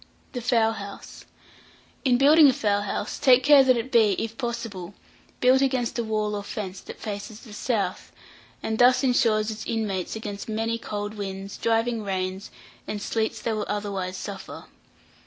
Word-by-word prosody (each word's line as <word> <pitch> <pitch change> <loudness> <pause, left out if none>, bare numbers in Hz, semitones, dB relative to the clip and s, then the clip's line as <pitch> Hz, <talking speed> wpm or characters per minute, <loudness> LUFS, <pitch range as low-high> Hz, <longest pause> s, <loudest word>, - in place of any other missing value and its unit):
THE 245 - -4
FOWL 230 -2 +3
HOUSE. 200 -2 -9 0.8
In 250 -3 +4
building 295 +3 +7
a - - +3
fowl 205 -3 +1
house, 205 +1 -3
take 255 -1 +5
care 285 0 +7
that 255 -2 +4
it 235 +3 -4
be, 220 -4 +5
if 225 0 -3
possible, 230 -7 -5 0.5
built 255 +1 +5
against 255 -3 0
a - - +1
wall 215 -1 -1
or 205 - -2
fence 200 -2 -6
that - - -10
faces 210 +1 -6
the 220 - -12
south, 220 -1 -2 0.5
and 220 0 -2
thus 250 +2 +5
insure 235 -4 +3
its 215 0 -4
inmates 205 -5 -2
against 210 -1 -6
many 225 +1 -1
cold 205 -1 -4
winds, 195 -1 -6
driving 230 0 0
rains, 190 -1 -3 0.4
and 210 - -3
sleets 220 +1 -2
they 230 - 0
will 215 -1 -3
otherwise 195 -3 -3
suffer. 195 -1 -7
220 Hz, 165 wpm, -25 LUFS, 205-240 Hz, 0.8 s, building